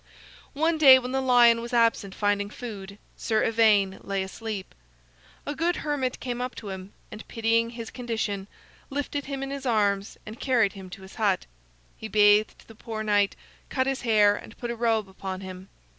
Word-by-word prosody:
One 320 +2 +1
day 270 -4 +9
when 250 -1 -4
the 265 0 0
lion 240 -2 +5
was 235 +1 -7
absent 230 -4 +2
finding 205 0 0
food, 200 -4 -8 0.2
Sir 220 -2 0
Ivaine 215 -4 +3
lay 195 -1 -2
asleep. 205 0 -6 0.7
A 290 - -3
good 335 +3 0
hermit 275 -4 -1
came 245 -1 -4
up 250 0 -4
to 210 - -8
him, 190 0 -7 0.2
and 215 - -10
pitying 230 0 +1
his 230 -1 -8
condition, 220 -5 -3 0.4
lifted 285 0 -3
him 275 -1 -4
in 270 - -5
his 275 -1 -5
arms 205 -3 +1
and 220 +2 -9
carried 235 -7 +2
him 190 -2 -10
to 190 +1 -10
his 190 - -12
hut. 200 -4 +2 0.5
He 220 - -7
bathed 210 0 +3
the 225 - -13
poor 220 0 -6
knight, 205 -2 +2 0.3
cut 260 -1 0
his 270 0 -2
hair, 210 -3 +4
and 220 - -11
put 240 -1 -4
a - - -4
robe 225 -3 +1
upon 190 0 -6
him. 185 0 -9
225 Hz, 185 wpm, -26 LUFS, 200-250 Hz, 0.7 s, day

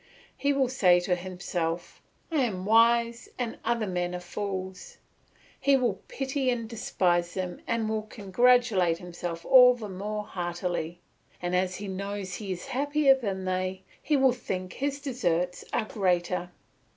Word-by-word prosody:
He 280 - +1
will 275 -2 +2
say 185 -9 +4
to 180 +1 0
himself, 175 -2 -3 0.3
"I 320 - 0
am 190 -5 -3
wise 235 +2 +3
and 240 -3 -3
other 235 -2 0
men 180 -2 -2
are - - -3
fools." 190 0 -5 0.6
He 280 -1 +4
will 235 -7 0
pity 270 -1 -1
and 235 -2 -1
despise 175 -6 0
them 185 -2 -4
and 230 -1 0
will 220 0 -1
congratulate 215 -3 +2
himself 175 -1 -6
all 250 -1 +8
the 220 -4 -7
more 210 +3 -4
heartily; 175 -2 -3 0.4
and 175 0 -1
as 185 0 +1
he 205 +2 -6
knows 195 0 -4
he 200 0 -5
is 180 -1 -5
happier 285 +1 +3
than 200 -8 -3
they, 185 0 -2 0.2
he 300 - +2
will 265 -2 +4
think 185 -6 -5
his 280 +1 -2
deserts 180 - -1
are 225 - 0
greater. 180 -5 0
195 Hz, 150 wpm, -28 LUFS, 180-240 Hz, 0.6 s, all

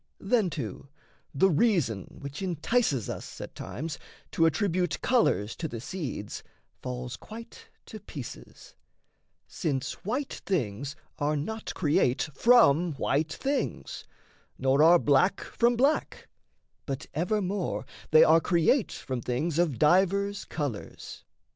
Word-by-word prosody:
Then, 210 -2 +2
too, 140 - -6 0.4
the 185 +7 +3
reason 150 - +2 0.2
which 140 +3 -7
entices 175 - 0
us - - -7
At - - -7
times 155 +3 -6 0.3
to 165 - +3
attribute 175 0 0
colours 115 - +2
to 165 - -3
the 120 -6 -6
seeds 130 - -5 0.4
Falls 125 -1 -5
quite 230 - -11 0.2
to - - -9
pieces, - - -10 0.7
since 140 -7 -3
white 255 +7 -2
things 140 - -2 0.2
are 150 +1 +1
not 220 +10 -4
Create 145 -4 +2
from 175 - +5
white 150 +3 0
things, 280 +1 -3 0.5
nor 135 +2 +2
are 170 +3 +8
black 155 +6 +3
from 240 +1 +1
black, 275 +6 0 0.6
But 135 +1 -4
evermore 190 +2 -1 0.2
they 155 - +8
are 165 +1 +6
create 180 - +2
from 130 -3 -4
things 145 +8 -1
Of 160 -8 +1
divers 195 +5 +2
colours. 145 -9 -6
165 Hz, 120 wpm, -28 LUFS, 140-200 Hz, 0.7 s, are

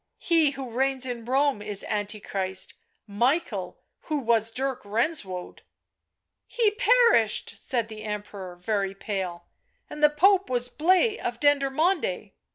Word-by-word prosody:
" - - -55
He 330 -4 +3
who 260 -3 -6
reigns 265 +2 0
in 240 -3 -5
Rome 270 -2 +1
is 205 -1 -2
Antichrist, 200 -2 -3 0.3
Michael, 245 +11 -1 0.3
who 305 - -1
was 230 -4 +2
Dirk 265 +2 -2
Renswoude 205 - -3 0.3
" - - -59
" - - -59
He 455 -3 +2
perished," 470 - +3
said 235 -3 -3
the 220 -1 -9
Emperor, 205 -3 -6
very 195 +1 -2
pale; 190 -4 -4 0.2
" - - -44
and 300 - -7
the 300 - +7
Pope 380 +6 +3
was 245 -1 +2
Blaise 370 - +2
of 235 -1 -3
Dendermonde." 290 - +1
245 Hz, 145 wpm, -26 LUFS, 205-300 Hz, 0.3 s, the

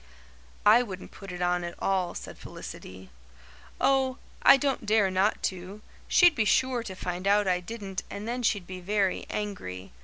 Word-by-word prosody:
"I 220 +4 +7
wouldn't 190 -6 -7
put 195 -2 -10
it 180 0 -4
on 175 0 +1
at 170 0 -5
all," 185 -3 0
said - - -8
Felicity. 95 0 -10 0.7
"Oh, 265 -1 +2 0.2
I 275 - +8
don't 270 -5 -1
dare 210 -3 +3
not 190 +3 +1
to. 185 +4 -10 0.2
She'd 350 -2 +6
be 225 - +1
sure 250 +3 +2
to 195 -5 -7
find 180 +1 -4
out 205 0 +4
I 180 -1 +2
didn't 195 0 -6
and 205 +2 -6
then 245 +2 -2
she'd 205 -5 0
be 185 0 -7
very 195 +1 0
angry. 95 - -5
200 Hz, 175 wpm, -28 LUFS, 180-225 Hz, 0.7 s, I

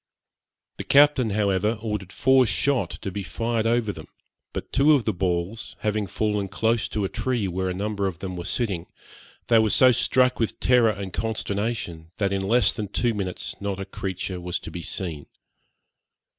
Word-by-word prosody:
The - - -4
captain, 140 -4 +5
however, 105 +1 +1
ordered 105 -4 -4
four 130 +1 +4
shot 130 +6 +1
to 95 - -3
be 100 - -4
fired 115 +3 -1
over 115 -2 +1
them, 80 - -10 0.4
but - - -6
two 145 +3 +5
of 135 -6 +2
the 110 - +1
balls, 90 +4 -2
having 105 -1 0
fallen 105 -2 -1
close 110 +4 0
to 105 -2 -2
a - - +1
tree 120 -1 -1
where 95 +1 -2
a - - -2
number 100 0 -1
of 90 -4 -4
them 95 +1 -5
were 85 - -5
sitting, 95 -8 -2 0.6
they 115 -1 +5
were 110 -1 +3
so 130 +4 +6
struck 125 +1 +3
with 115 - -1
terror 125 -3 +4
and 100 -3 -4
consternation, 100 -6 -3
that, 100 -1 0
in 95 - 0
less 110 +3 +3
than 105 - -4
two 120 +4 0
minutes, 95 -4 -4
not 100 -1 -3
a 95 - -4
creature 95 -1 -5
was 90 0 -2
to - - -8
be 85 - -6
seen. 80 -5 -4
105 Hz, 185 wpm, -25 LUFS, 95-115 Hz, 0.6 s, so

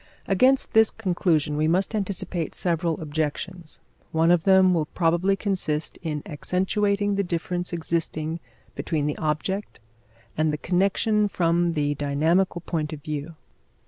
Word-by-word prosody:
Against 255 +8 +3
this 220 -1 +6
conclusion 170 -7 0
we 155 +1 +1
must 185 +6 +1
anticipate 185 -5 -2
several 170 -2 0
objections. 160 +3 -4 0.3
One 165 +1 +3
of 175 -2 +2
them 190 -1 +6
will 160 -3 0
probably 175 +4 +1
consist 185 -7 -2
in 150 -3 -3
accentuating 200 +5 0
the 200 - +2
difference 175 0 -2
existing 165 -1 -2 0.3
between 155 -3 -2
the 150 - -2
object 165 +6 -2 0.6
and 155 0 +1
the 150 - -2
connection 200 +5 +1
from 170 -2 +1
the 145 -2 0
dynamical 160 +6 +1
point 155 -3 -3
of 145 -2 -9
view. 155 +1 -5
170 Hz, 135 wpm, -25 LUFS, 155-190 Hz, 0.6 s, this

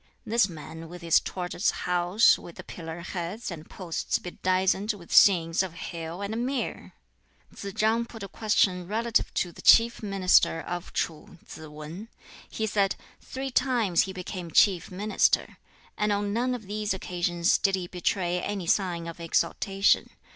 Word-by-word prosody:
this 220 -3 +2
man 160 0 -9
with 175 0 -10
his 165 -1 +5
tortoise 180 +1 -2 0.2
house, 180 +5 +4
with 170 - -11
the - - -9
pillar 165 0 -8
heads 180 +5 -5
and 160 -2 -9
posts 175 -4 -2
bedizened 185 +3 0
with 180 -5 -10
scenes 170 -4 +5
of 190 -3 -4
hill 170 +2 -6
and 220 +4 -2
mere!" 260 0 -3 0.6
Tsz 200 - -7
chang 225 +2 +2
put 225 -2 -10
a - - -5
question 190 -3 +1
relative 225 +3 0
to 175 - 0
the - - -13
chief 235 +1 +6
Minister 195 -5 +3
of 175 +2 -6
Tsu, 165 +2 -4
Tsz 155 - -10
wan. 155 +7 -9 0.4
He 220 - -2
said, 200 -2 +1 0.3
"Three 265 0 -5
times 240 -9 +2
he 190 - -6
became 180 -1 -6
chief 185 +1 +3
Minister, 205 +3 +1 0.4
and 210 0 +1
on 205 0 -1
none 250 +3 0
of 225 -4 -9
these 210 0 -2
occasions 175 -2 0
did 195 -1 +2
he 185 -2 -4
betray 180 0 -1
any 200 -3 -3
sign 175 -2 0
of 170 0 -8
exultation. 195 +4 +1
185 Hz, 160 wpm, -27 LUFS, 170-210 Hz, 0.6 s, chief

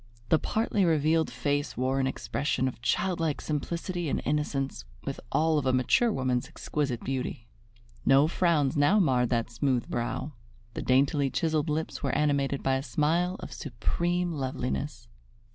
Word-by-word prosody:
The 160 - +5
partly 215 -2 0
revealed 160 -1 +3
face 145 0 -2
wore 130 +2 +1
an 130 - +2
expression 130 0 -1
of 125 -2 -6
childlike 165 +1 0
simplicity 170 +2 -3
and - - 0
innocence, 140 - -1 0.2
with - - -4
all 160 -1 +3
of 135 - -2
a 130 - +3
mature 130 - +3
woman's 130 - 0
exquisite 140 -6 -3
beauty. 130 -3 -3 0.6
No 135 +3 +5
frowns 165 -4 +2
now 145 +8 +4
marred 125 - +3
that 115 -1 0
smooth 125 0 0
brow; 120 +5 -3 0.4
the - - -4
daintily 140 +2 +3
chiseled 155 +2 0
lips 155 +1 -2
were 140 - -1
animated 140 -2 +1
by 135 0 +2
a - - -3
smile 160 +8 +1
of - - -7
supreme 175 +7 -1
loveliness. 130 - -3
145 Hz, 150 wpm, -28 LUFS, 130-160 Hz, 0.6 s, The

